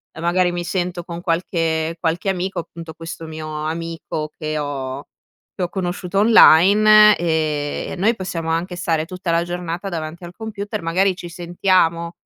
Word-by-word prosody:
e - - -9
magari 175 +1 +2
mi 175 0 -3
sento 180 0 -2
con 170 0 -7
qualche 165 -1 -1
qualche 170 +3 -1
amico, 185 -1 -2
appunto 165 -1 -8
questo 165 0 -8
mio 155 -1 -5
amico 165 -1 -4
che 155 -1 -3
ho 140 -1 -4 0.5
che 185 - -2
ho 175 - -1
conosciuto 180 +1 -2
online 210 +1 +7
e 155 -3 -1
noi 220 +6 +2
possiamo 170 -4 -4
anche 175 +3 -1
stare 165 -3 0
tutta 180 0 -4
la 170 0 +2
giornata 175 +2 -4
davanti 165 0 -6
al 175 - -10
computer, 210 -4 -5
magari 185 +3 +2
ci 175 -1 -8
sentiamo, 170 -1 0
170 Hz, 155 wpm, -20 LUFS, 160-185 Hz, 0.5 s, online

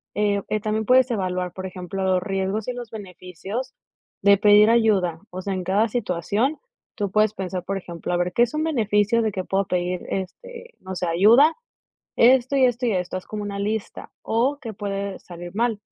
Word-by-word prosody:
eh 205 -1 +1
eh, 215 - 0
también 215 0 -1
puedes 255 +1 +5
evaluar, 185 -4 -2
por 190 0 -6
ejemplo, 185 +1 -5
los 185 -1 +1
riesgos 195 +3 -2
y 250 - -2
los 245 -2 -7
beneficios 200 +4 -7 0.5
de 200 -1 +6
pedir 210 +1 +6
ayuda, 195 -8 +2
o 185 +1 -6
sea, 200 - -2
en 185 -1 -3
cada 200 +5 +2
situación, 215 - -1 0.4
tú 205 -4 -2
puedes 215 0 +3
pensar, 185 -2 -4
por 195 +2 -3
ejemplo: 175 -2 -6
"A 175 - +2
ver, 175 0 -1
¿qué - - +2
es 235 - -1
un 305 0 -1
beneficio 225 -5 +2
de 220 -1 0
que 185 -1 -4
puedo 195 +1 0
pedir, 180 0 -1
este, 480 - -6
no 190 0 -7
sé, 180 - -2
ayuda?, 230 - +5 0.6
esto 255 +3 +4
y 265 - +5
esto 245 0 +1
y 225 - +1
esto", 180 0 -2
haz - - -13
como 210 -1 -5
una 200 -1 -5
lista, 210 +1 -4
o 255 +6 0
qué 225 -5 -6
puede 200 -1 -4
salir 175 +1 -10
mal, 225 -2 0
205 Hz, 200 wpm, -23 LUFS, 185-230 Hz, 0.6 s, de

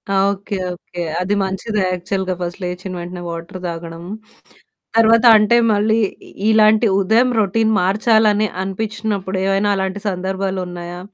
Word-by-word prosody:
ఆ! - - +3 0.2
Okay, 200 0 -5 0.2
okay. 175 0 -9 0.2
అది 190 +3 -1
మంచిది. 190 +3 -3
యాక్చువల్‌గా 185 +1 -2
ఫస్ట్ 175 +3 -4
లేచ్చిన 180 +1 -5
వెంటనే 175 +1 -7
వాటర్ 170 +2 -7
తాగడం. 165 0 -7 0.9
తర్వాత 230 +1 +5
అంటే 215 +3 +3 0.2
మళ్ళీ 215 +2 +2 0.3
ఇ - - -14 0.2
ఇలాంటి 215 +1 +5
ఉదయం 225 +6 +3
రొటీన్ 220 +2 +1
మార్చాలని 215 +2 +3 0.2
అనిపించినప్పుడు 205 -1 -3
ఏవైనా 195 +1 +1
అలాంటి 190 +1 -3
సందర్భాలున్నాయా? 180 -2 -4
195 Hz, 125 wpm, -18 LUFS, 180-215 Hz, 0.9 s, తర్వాత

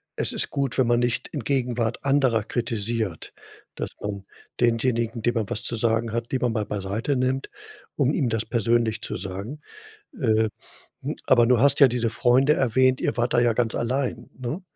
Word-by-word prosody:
es - - 0
ist - - 0
gut, 140 -2 -2
wenn 130 - +3
man 120 0 +3
nicht 120 -1 -1
in 145 - -4
Gegenwart 125 -2 -1
anderer 135 -6 +3
kritisiert, 110 -5 -3 0.4
dass - - -4
man 100 -1 -4 0.4
denjenigen, 115 -1 +1
den 120 +2 +1
man 110 -4 -2
was 105 - -3
zu - - -1
sagen 115 0 0
hat, 115 0 -3
lieber 130 -2 +1
mal 110 -2 -1
beiseite 105 +8 -2
nimmt, 130 +1 -1 0.5
um 140 0 +2
ihm 130 - +1
das 115 -1 -1
persönlich 115 0 +1
zu - - -4
sagen. 100 - -6 0.6
Äh, 110 -4 +2 0.5
hm, - - -3
aber 120 -2 +5
du 125 -1 +3
hast 140 +2 +4
ja 140 - +9
diese 120 -1 0
Freunde 130 +5 +3
erwähnt. 130 0 +2
Ihr - - 0
wart 120 +1 0
da 120 - +5
ja 120 -1 +3
ganz 115 0 0
allein, 130 +2 -2
ne? 130 +9 -4
120 Hz, 185 wpm, -24 LUFS, 110-130 Hz, 0.6 s, ja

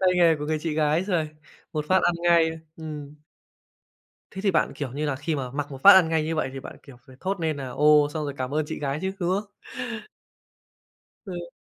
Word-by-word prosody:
tay 190 - +4
nghề 170 -2 +5
của 150 - -5
người 155 0 0
chị 160 -1 -2
gái 155 +3 +2
rồi. 175 -6 0 0.4
Một 150 -1 -2
phát 185 0 +4
ăn 175 - +3
ngay. 170 -2 +4 0.3
Ừm. 150 -2 -7 1.2
Thế 190 - -6
thì 200 - +3
bạn, 165 - +1
kiểu 135 -4 -5
như 150 +2 -2
là, 135 - -1
khi 150 +3 -2
mà 130 -3 -4
mặc 145 +2 -4
một 135 -1 -9
phát 200 - +11
ăn 190 -3 +6
ngay 160 -1 +1
như 160 +1 -2
vậy 155 - -1
thì 135 - -6
bạn, - - -10
kiểu, 135 -3 -14
phải 130 - -15
thốt 195 0 -2
nên 160 -2 0
nà 135 -2 -5
"Ồ!", 150 +2 +5
xong 155 -1 -2
rồi 145 - -3
cảm 130 -1 -3
ơn 155 0 +1
chị - - -5
gái 140 0 -2
chứ, 190 0 -1
đúng 175 - 0
không? 200 +2 -1 1.8
Ừ. 175 -3 -6
155 Hz, 230 wpm, -25 LUFS, 145-175 Hz, 1.8 s, phát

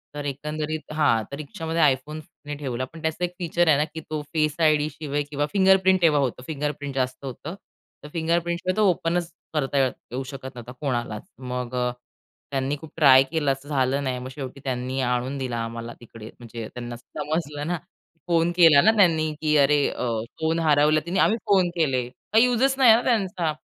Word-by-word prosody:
तर 145 -1 -5
एकंदरीत 150 +2 -4
हां, 130 -8 +2
तर - - -4
रिक्षामध्ये 160 +2 -3
iPhone 150 +4 -9
तिने 145 0 -10
ठेवला. 130 -3 -3
पण 160 +5 -13
त्याचा 160 +2 -2
एक 175 - -7
फीचर 175 0 +1
आहे 150 - +5
ना 150 - +2
की 160 - -5
तो 155 -1 -2
फेस 155 -2 +1
आय-डी 155 -2 +3
शिवाय 145 0 -3
किंवा 145 0 -1
फिंगरप्रिंट 190 -1 +4
तेव्हा 155 -4 +4
होतं 125 -1 -2
फिंगरप्रिंट 145 -2 -4
जास्त 130 +1 -2
होतं. 145 +7 -6 0.5
तर - - -8
फिंगरप्रिंटशिवाय 170 +2 0
तो 215 -2 +4
ओपन 170 0 +1 0.3
करता 145 -2 -1 0.3
येऊ 130 +2 -3
शकत 130 0 -8
नव्हता 120 0 -9
कोणालाच. 120 -6 -2 0.2
मग 125 -1 -4
अ, 125 0 0 0.6
त्यांनी 135 +1 -1
खूप 160 +1 -12
ट्राय 135 -4 +7
केलं 150 -4 +1
असं 135 +2 -6
झालं 135 -1 +1
नाही, 130 -2 -2
मग 125 +1 -7
शेवटी 135 -1 -7
त्यांनी 130 0 -3
आणून 125 +2 -1
दिला 125 -3 -3
आम्हाला 115 +1 -6
तिकडे. 115 -2 -11
म्हणजे 115 -2 -7
त्यांना 120 -1 -6
समजलं 150 +4 -4
ना. 175 - -1 0.5
फोन 170 0 +2
केला 160 -5 +7
ना 220 - +6
त्यांनी 160 -5 +3
की 155 -1 +2
अरे! 145 0 +4
अ, - - -5 0.4
फोन 160 +1 +1
हरवला 155 -1 +4
तिने 180 +2 -1
आम्ही 225 - +3
फोन 190 -3 +4
केले. 135 -7 +1 0.3
काही 225 +2 +7
युजच 250 +2 +2
नाही 255 -4 +7
आहे 225 +2 +5
ना - - -3
त्यांचा. 190 -8 0
150 Hz, 190 wpm, -24 LUFS, 130-165 Hz, 0.6 s, ट्राय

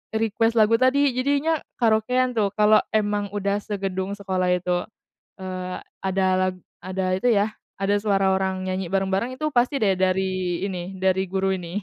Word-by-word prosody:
request 225 +1 +1
lagu 215 +1 +5
tadi 275 +2 +3
jadinya 285 +5 +1 0.2
karaokean 250 +2 +2
tuh. 210 -3 +2
Kalo 215 0 +5
emang 205 -1 0
udah 200 0 0
segedung 195 -2 -3
sekolah 185 -2 -1
itu. 180 0 0 0.6
Eee 185 -1 -5 0.3
ada 190 0 +1
la 185 0 +2 0.3
ada 185 0 -2
itu 190 - -2
ya, 205 0 +2 0.3
ada 195 +1 +1
suara 195 -2 +2
orang 190 0 -1
nyanyi 185 0 -2
bareng-bareng 195 +5 0
itu 305 - 0
pasti 250 +3 +2
deh 195 -3 +3
dari 185 -1 0
ini, 185 0 -5
dari 190 0 +1
guru 190 0 0
ini. 180 +3 -5
195 Hz, 155 wpm, -24 LUFS, 185-220 Hz, 0.6 s, lagu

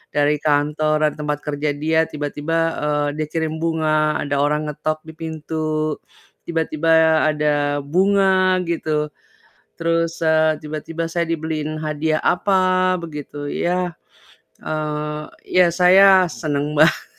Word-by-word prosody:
dari 145 0 +2
kantor, 150 +1 +1
dari - - -13
tempat 150 -1 -2
kerja 150 0 -2
dia 160 +2 +1
tiba-tiba, 150 +2 -3 0.2
eee, 150 0 0
dia 155 - -1
kirim 160 0 -3
bunga, 155 -2 +1
ada 145 0 -2
orang 150 +1 0
ngetok 155 +1 -3
di 160 0 -11
pintu, 155 -1 -3 0.5
tiba-tiba 160 -1 +2
ada 145 -1 0
bunga 185 +3 +2
gitu, 155 -3 -2 0.7
terus, 165 0 0
eee, 160 -1 +2
tiba-tiba 155 +2 -5
saya 170 +1 -1
dibeliin 155 -1 -3
hadiah 155 0 -1
apa 185 -1 +2
begitu 150 -3 -7
ya, 180 0 -1 0.7
eee, 150 0 -3 0.3
ya 180 -1 +4
saya 185 +2 +6
seneng 150 -2 -3
banget. 155 +2 +4
155 Hz, 120 wpm, -20 LUFS, 150-165 Hz, 0.7 s, saya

